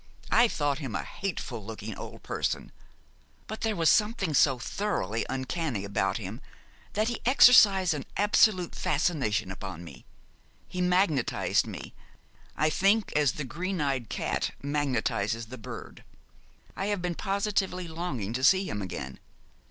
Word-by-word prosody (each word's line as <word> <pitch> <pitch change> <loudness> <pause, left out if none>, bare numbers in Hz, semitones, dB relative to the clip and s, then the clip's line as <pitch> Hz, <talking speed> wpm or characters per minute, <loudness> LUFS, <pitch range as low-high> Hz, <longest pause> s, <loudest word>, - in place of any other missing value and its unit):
I 235 +1 +6
thought 145 -8 -1
him 130 -8 -5
a - - -2
hateful 135 - -5
looking 110 0 -7
old - - -9
person; - - -2 0.7
but 220 - -7
there 220 -1 0
was 165 -3 +1
something 210 -5 +2
so 135 0 +4
thoroughly 120 - -2
uncanny 130 - -2
about 100 -1 0
him 110 +4 -7 0.5
that 215 +2 +1
he 240 - -4
exercised 205 - +7
an 145 -3 -5
absolute 205 -3 +3
fascination 140 - 0
upon 95 -3 -7
me: 70 -7 -12 0.6
he 180 -1 -4
magnetised 180 - +2
me, - - -8 0.6
I 155 - +3
think, 200 +5 +2
as 145 -4 +3
the 150 - -4
green 180 +8 -3
eyed 135 -6 -1
cat - - -2
magnetises 120 -6 -1
the 130 - -8
bird. 110 - -9 0.7
I 195 - -2
have 205 -3 -1
been 175 -1 -1
positively 195 -2 -1
longing 160 - -4
to 130 +2 -3
see 190 +7 +5
him 105 - -3
again. 70 -8 -6
150 Hz, 145 wpm, -28 LUFS, -, 0.7 s, exercised